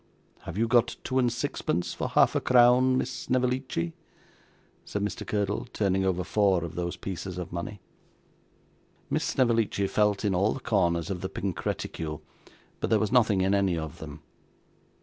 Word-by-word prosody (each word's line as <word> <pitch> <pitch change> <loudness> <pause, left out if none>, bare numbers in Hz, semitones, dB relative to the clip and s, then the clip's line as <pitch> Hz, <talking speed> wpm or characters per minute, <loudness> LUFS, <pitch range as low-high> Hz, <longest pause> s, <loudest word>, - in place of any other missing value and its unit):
Have 80 - -6
you 115 +2 +2
got 120 0 +3
two 130 0 0
and 125 -2 +2
sixpence 90 -7 -2
for - - -3
half - - +4
a - - 0
crown, 125 +1 +5
Miss 130 - -1
Snevellicci?' 125 -10 -1 0.9
said 100 - -3
Mr. 105 - -4
Curdle, 100 -1 -1
turning 95 -2 +1
over 90 -1 0
four 95 -2 +2
of 85 -1 -6
those 85 0 -3
pieces 95 -1 -5
of 90 -2 -5
money. 85 +3 -5 1.3
Miss - - +1
Snevellicci 115 -5 +1
felt 105 +1 +1
in 100 - +2
all 100 +4 +2
the - - -6
corners 85 -6 +1
of 90 -2 -4
the 95 - -3
pink 95 -3 -4
reticule, 75 -1 -4 0.6
but - - -2
there 110 - +4
was 105 0 -1
nothing 110 -6 +4
in 95 +1 +2
any 95 -3 +2
of 80 -2 -6
them. 75 -1 -9
100 Hz, 170 wpm, -27 LUFS, 90-115 Hz, 1.3 s, crown